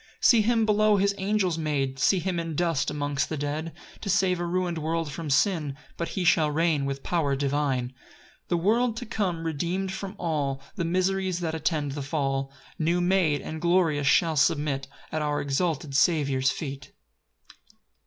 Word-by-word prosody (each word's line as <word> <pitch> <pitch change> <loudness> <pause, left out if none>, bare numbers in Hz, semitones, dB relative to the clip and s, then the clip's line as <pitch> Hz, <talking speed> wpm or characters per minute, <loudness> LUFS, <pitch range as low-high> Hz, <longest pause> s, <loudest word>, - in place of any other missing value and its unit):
4 - - -32
See 235 -3 +6
him 225 +1 +2
below 210 -1 +4
his 200 +1 +2
angels 190 -4 0
made, 135 -4 -1
See 190 +8 +4
him 180 0 -1
in 165 -2 -4
dust 165 -4 +1
amongst 145 -1 -1
the 155 - -3
dead, 150 +3 -3 0.3
To 200 - -5
save 190 -2 +2
a 175 - -1
ruin'd 175 -1 -1
world 160 0 -2
from 155 +1 -5
sin; 150 -2 +1 0.2
But 170 - -3
he 190 - -3
shall 160 -3 +4
reign 155 -2 +1
with 140 0 -4
power 155 -6 0
divine. 135 -2 0
5 130 - -25 0.5
The 175 - +1
world 225 +6 +2
to 245 - -5
come, 185 -7 -2
redeem'd 175 +5 -2
from 190 +1 -6
all 145 -6 -1
The 180 -4 -2
miseries 185 +1 0
that 160 -2 -2
attend 155 -2 -1
the 145 +1 -4
fall, 135 -2 -1 0.3
New 170 +2 +1
made, 175 -5 +2
and 160 0 -6
glorious, 170 -5 +2
shall 160 +3 +4
submit 140 -1 +1 0.2
At 155 - -1
our 150 -1 0
exalted 145 0 -1
Saviour's 140 -4 +3
feet. 135 -3 -6
160 Hz, 175 wpm, -26 LUFS, 145-185 Hz, 0.5 s, See